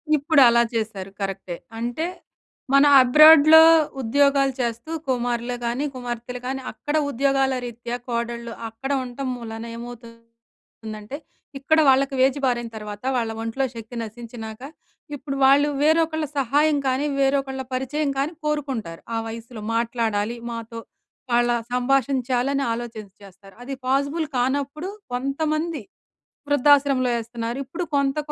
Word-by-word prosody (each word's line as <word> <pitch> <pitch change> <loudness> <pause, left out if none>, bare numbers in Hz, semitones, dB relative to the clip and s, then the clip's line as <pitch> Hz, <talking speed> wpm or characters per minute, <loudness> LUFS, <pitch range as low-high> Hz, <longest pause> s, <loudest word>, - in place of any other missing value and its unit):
ఇప్పుడలా 275 -6 +5
చేశారు 210 -4 -3
కరెక్టే. 195 -2 -4 0.2
అంటే 240 +7 -2 0.7
మన 275 +1 +6 0.2
అబ్రాడ్‌లో 310 +4 +8 0.4
ఉద్యోగాలు 275 +2 +2
చేస్తూ 235 +5 -3 0.2
కుమారులే 245 -1 -1
కానీ, 240 +4 -1
కుమార్తెలే 245 0 -5
కానీ, 265 +1 -3
అక్కడ 290 +7 -4
ఉద్యోగాల 270 0 +1
రీత్యా 235 +1 -5
కోడళ్ళు, 235 0 -3 0.2
అక్కడ 245 +5 -6
ఉంటం 255 +2 -5
మూలాన 230 -1 -7
ఏమవుతుందంటే 230 -1 -11 0.4
ఇక్కడ 315 +3 +2
వాళ్ళకి 270 +1 +3
ఏజ్ 270 +1 0
బారైన 240 -2 -1
తర్వాత 210 0 -8
వాళ్ళ 225 -2 -1
ఒంట్లో 230 +4 -1
శక్తి 230 +1 -9
నశించినాక, 225 0 -9 0.5
ఇప్పుడు 275 0 -5
వాళ్ళు 280 +2 +5
వేరొకళ్ళ 315 0 +2
సహాయం 290 +4 +2
కానీ, 260 +3 0
వేరొకళ్ళ 270 -1 0
పరిచయం 280 +3 -1
కానీ 280 +5 -1
కోరుకుంటారు. 265 - -3
ఆ - - 0
వయస్సులో 230 0 -8
మాట్లాడాలి 230 -2 -1 0.2
మాతో, 230 0 -7 0.5
వాళ్ళ 240 0 +3 0.2
సంభాషించాలని 260 +1 +1
ఆలోచించి 225 -4 -7
చేస్తారు. 195 0 -16
అది 275 +2 -6
పాజిబుల్ 280 +5 0
కానప్పుడు 280 +7 -1 0.2
కొంతమంది 305 +4 -2 0.7
వృద్ధాశ్రమంలో 280 -2 +4
ఏస్తున్నారు. 230 +1 -5
ఇప్పుడు 335 +7 -5
కొంత 280 0 +1
250 Hz, 115 wpm, -23 LUFS, 230-280 Hz, 0.7 s, అబ్రాడ్‌లో